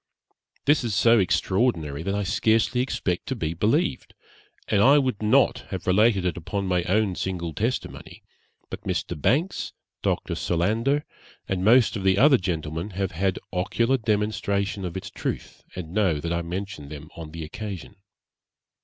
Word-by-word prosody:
This 145 -1 +4
is 115 -4 -1
so 115 +3 +5
extraordinary 85 - +1
that 100 +4 -2
I 105 - 0
scarcely 110 +5 +2
expect 90 -8 -2
to 130 - -2
be 80 -8 -2
believed; 125 - 0 0.5
and 100 - +2
I 140 +6 +7
would 130 -7 0
not 105 0 +3
have - - -5
related 100 +1 +3
it 90 - -1
upon 100 +4 -3
my 90 -1 +1
own 105 0 +2
single 85 -3 -3
testimony, 115 - -4 0.5
but - - -6
Mr. 85 - -2
Banks, 145 - 0 0.3
Dr. - - -1
Solander, 115 - 0 0.4
and 95 -1 -1
most 120 +3 +5
of 100 - -4
the 95 0 +3
other 135 +2 +6
gentlemen 80 0 -3
have 95 -2 -1
had 95 +1 0 0.2
ocular 115 +8 +1
demonstration 105 -3 -1
of 90 +1 -4
its 95 - -7
truth, - - -5
and 85 -2 -6
know 95 -7 +2
that 85 +3 -2
I 85 - 0
mention 90 -3 -5
them 75 0 -9
on 80 -2 -8
the 80 +1 -7
occasion.' 95 +3 -7
100 Hz, 160 wpm, -25 LUFS, 85-115 Hz, 0.5 s, I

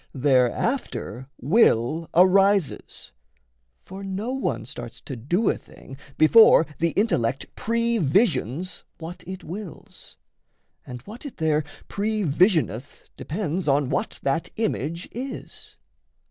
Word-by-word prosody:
Thereafter 130 - 0
will 155 - +2
arises; 195 -1 +3 0.7
For 190 +1 -9
no 195 +5 -3
one 265 - -2
starts - - -7
to 135 - -7
do 175 - 0
a - - +4
thing, 135 - -13 0.2
before 165 0 +7
The 170 - +2
intellect 135 - 0
previsions 200 - 0 0.2
what 170 +2 -8
it 190 +1 -7
wills; 185 -1 -10 0.7
And 125 -1 -8
what 220 +5 -11
it 285 - -8
there 155 -1 +1 0.2
pre 215 +1 -1
visioneth 155 - +1
depends 175 0 -3
On 140 -1 +2
what 140 - -2
that 140 +4 0
image 170 - -2
is. 260 +3 -8
175 Hz, 110 wpm, -24 LUFS, 140-210 Hz, 0.7 s, before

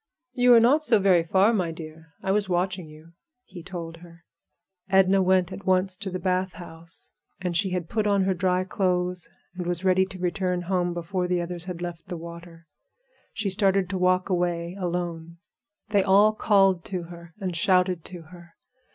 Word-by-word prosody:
"You 250 0 +2
were 240 -1 +9
not 270 +7 +4
so 235 -5 +4
very 190 -4 +3
far, 190 +6 +3
my 185 -6 0
dear; 160 0 -10 0.2
I 190 - 0
was 205 -1 0
watching 180 -1 -1
you," 155 +2 -15 0.3
he 185 -2 -11
told 165 -2 -7
her. 170 0 -16 0.7
Edna 190 0 +4
went 185 -1 +2
at 195 - -10
once 185 0 +2
to 200 0 -5
the 185 - -4
bath 185 0 -1
house, 165 -1 -12 0.3
and 180 -2 -3
she 190 +3 +2
had 180 -2 -3
put 215 +1 -1
on 200 -1 +2
her 190 0 +1
dry 185 0 0
clothes 180 -1 -1 0.2
and 180 -1 -5
was 175 +1 -3
ready 190 0 +3
to 190 - -10
return 180 0 -1
home 175 -1 -1
before 180 +2 -2
the 180 0 0
others 175 0 -5
had 180 -2 -6
left 175 -1 -7
the 175 - -5
water. 170 0 -11 0.7
She 205 -3 -2
started 195 -1 +1
to 190 - -2
walk 185 0 +2
away 175 -1 -1
alone. 170 -2 -4 0.5
They 205 -2 +3
all 200 +3 +5
called 195 -5 +3
to 185 -3 -4
her 170 0 -12
and 185 -4 -3
shouted 180 -2 +2
to 175 -3 -7
her. 170 +1 -16
180 Hz, 185 wpm, -25 LUFS, 170-190 Hz, 0.7 s, were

